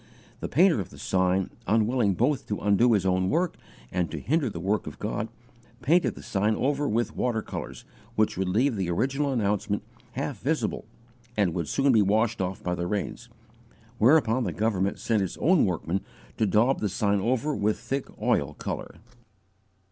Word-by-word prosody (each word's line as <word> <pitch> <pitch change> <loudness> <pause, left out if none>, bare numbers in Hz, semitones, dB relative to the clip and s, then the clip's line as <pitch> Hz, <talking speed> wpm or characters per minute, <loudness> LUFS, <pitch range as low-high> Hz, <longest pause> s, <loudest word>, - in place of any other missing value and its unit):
The - - -4
painter 170 - +4
of 95 - -4
the 70 - -14
sign, 95 +4 +1 0.2
unwilling 110 0 +2
both 140 - +1
to 105 - -2
undo 105 +4 +3
his 100 -3 +2
own 95 0 +2
work 170 +2 +1 0.4
and 90 -2 0
to 80 - -5
hinder 145 - +1
the 85 - -6
work 100 +5 -1
of - - -7
God, - - -3 0.6
painted 170 +5 +3
the - - -11
sign 105 +2 +1
over 145 +3 0
with 115 +2 -1
water 115 -3 0
colours, - - -7 0.3
which 110 0 +2
would 95 0 -1
leave 120 +7 +2
the 95 -3 -2
original 135 +10 0
announcement 105 -3 0 0.3
half - - -3
visible, - - -1 0.5
and 95 -5 +2
would 85 -3 -2
soon 135 0 +2
be 110 -3 +5
washed 110 +2 +2
off 95 +1 -3
by 90 - -1
the 85 0 -2
rains; 105 +4 -3 0.7
whereupon 125 -1 +4
the 90 -7 -2
government 100 -2 0
sent 110 -3 0
its 95 - -3
own 175 +2 +4
workman 90 +1 -1 0.4
to 110 - +2
daub 115 +7 +3
the 105 - -1
sign 100 +2 +1
over 130 +8 0
with 105 +1 +1
thick 130 +4 -3
oil 105 - +1
colour. - - -5
105 Hz, 180 wpm, -27 LUFS, 95-125 Hz, 0.7 s, be